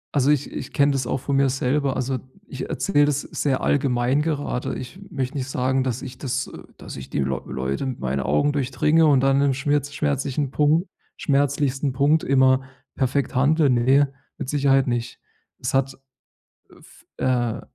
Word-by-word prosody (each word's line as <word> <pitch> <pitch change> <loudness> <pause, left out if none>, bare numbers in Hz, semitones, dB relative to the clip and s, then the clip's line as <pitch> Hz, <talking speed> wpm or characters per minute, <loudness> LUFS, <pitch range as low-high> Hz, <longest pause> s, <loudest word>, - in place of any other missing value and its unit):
Also 140 0 +4
ich 145 -1 0
ich - - -7
kenne 140 0 +3
das 130 -3 -1
auch - - 0
von 140 +2 -2
mir 135 0 +3
selber 135 +1 0
also 130 0 -1 0.3
ich 130 -1 -6
erzähle 145 -8 +2
das 145 -1 0
sehr 135 -3 -1
allgemein 130 -1 +1
gerade. 145 -5 -2
Ich 130 +7 -8
möchte 135 0 -3
nicht 135 -1 -3
sagen, 130 0 0
dass 130 -2 -2
ich 125 - -8
das 130 0 -3 0.3
dass - - -9
ich 70 - -9
die - - -2
Leu 65 -1 -1
Leute 65 - -3
mit 130 -2 -4
meinen 65 +1 -1
Augen 75 - +1
durchdringe 150 +4 +2
und 140 -3 +5
dann 135 +1 +3
im 140 -1 +3
schmirz 145 +1 0
schmerzlichen 140 -1 -1
Punkt 155 +6 +2 0.3
schmerzlichsten 140 -1 0
Punkt 145 +4 +2
immer 130 -1 +4 0.3
perfekt 135 +1 -1
handle, 145 +3 +3
ne, 135 +3 +3 0.2
mit - - -5
Sicherheit 135 -1 +2
nicht. 120 0 -3 0.4
Es - - -3
hat, 135 0 +1 0.8
äh, - - -18
f - - -19
äh, 120 -3 0
135 Hz, 175 wpm, -23 LUFS, 130-145 Hz, 0.8 s, und